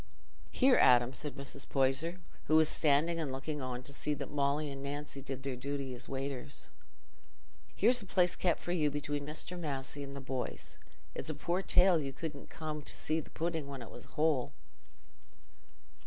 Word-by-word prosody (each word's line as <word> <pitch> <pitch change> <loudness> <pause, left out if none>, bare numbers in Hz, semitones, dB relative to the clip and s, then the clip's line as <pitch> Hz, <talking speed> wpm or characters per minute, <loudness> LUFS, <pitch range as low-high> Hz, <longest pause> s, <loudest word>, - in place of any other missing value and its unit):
"Here, 260 -1 +5
Adam," 120 0 +6
said 145 -4 -3
Mrs. 140 0 -4
Poyser, 140 +6 +1 0.3
who 155 - +3
was 160 0 +6
standing 160 +3 +3
and 150 -4 -1
looking 140 +3 -3
on 125 -1 -4
to 140 - -6
see 150 +2 -1
that 140 -1 -6
Molly 145 +1 +1
and 135 0 -6
Nancy 140 0 -5
did 135 -1 -6
their 135 -2 -2
duty 135 +1 -3
as 125 +1 -8
waiters, 135 - -3 1.0
"here's 240 +4 +5
a 200 - -10
place 180 -2 +3
kept 175 -3 +1
for 175 - -4
you 155 -4 +3
between 145 0 -3
Mr. 165 +4 -3
Massey 140 -3 -3
and 140 0 -7
the - - -4
boys. 130 -1 -4 0.3
It's - - -4
a - - -2
poor 175 +2 0
tale 180 -3 +5
you 135 -1 -4
couldn't 145 0 -6
come 155 -1 -4
to - - -5
see 155 +1 +1
the - - -8
pudding 165 -3 -2
when 135 -3 -6
it - - -11
was - - -10
whole." 150 -5 +2
145 Hz, 185 wpm, -34 LUFS, 135-160 Hz, 1.0 s, Adam